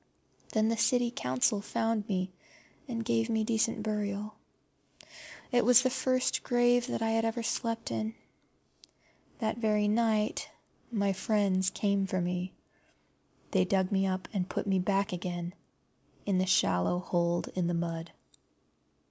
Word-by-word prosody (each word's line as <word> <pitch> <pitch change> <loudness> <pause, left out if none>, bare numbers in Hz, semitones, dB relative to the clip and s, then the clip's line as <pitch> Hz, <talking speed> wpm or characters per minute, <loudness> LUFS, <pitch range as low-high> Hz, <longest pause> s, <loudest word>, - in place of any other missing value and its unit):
Then 220 0 +3
the 230 - +1
County 245 +1 +2
Council 130 - 0
found 225 0 -1
me, 185 -1 -1 0.6
and 230 -3 -3
gave 230 0 +1
me 220 -1 +1
decent 220 0 0
burial. 210 -1 -2 1.2
It 245 -1 +3
was 250 +1 +7
the 255 - +2
first 255 0 +1
grave 245 0 +3
that 230 - -2
I 225 - +1
had 225 0 +2
ever 225 +1 -1
slept 230 0 -2
in. 220 +1 -2 1.2
That 220 0 -2
very 210 -2 +2
night 215 -1 +1 0.4
my 200 -3 +1
friends 190 -2 +1
came 200 -1 0
for 185 0 -1
me. 180 +1 -2 1.0
They 190 -2 +4
dug 190 +1 +1
me 195 -1 +2
up 185 0 -2
and 185 -3 -1
put - - -2
me 195 -2 +2
back 195 +1 +1
again 175 -1 -4 0.7
in 195 -2 +1
the 185 - +1
shallow 95 - +3
hold 175 -1 0
in 180 -2 -1
the 175 - 0
mud. 165 0 -3
210 Hz, 145 wpm, -30 LUFS, 185-225 Hz, 1.2 s, was